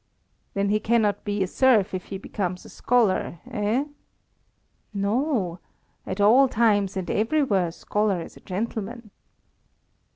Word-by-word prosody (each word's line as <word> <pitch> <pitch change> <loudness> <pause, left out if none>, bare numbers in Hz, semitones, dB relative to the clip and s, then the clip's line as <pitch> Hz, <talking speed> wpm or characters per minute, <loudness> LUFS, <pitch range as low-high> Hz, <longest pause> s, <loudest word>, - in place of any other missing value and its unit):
"Then 200 0 +1
he 210 +1 +2
cannot 215 -2 +1
be 205 -1 -1
a - - -2
serf 215 -3 +3
if 185 -1 -4
he 195 - -6
becomes 185 -2 -4
a - - -11
scholar, 220 -8 +1
eh?" 215 +7 0 1.1
"No. 200 - 0 0.5
At 190 - -4
all 235 +7 +6
times 205 -5 +2
and 185 - -3
everywhere 220 - +1
a - - -5
scholar 205 +2 -1
is 165 - -9
a - - -13
gentleman." 220 +3 -5
205 Hz, 135 wpm, -25 LUFS, 195-230 Hz, 1.1 s, all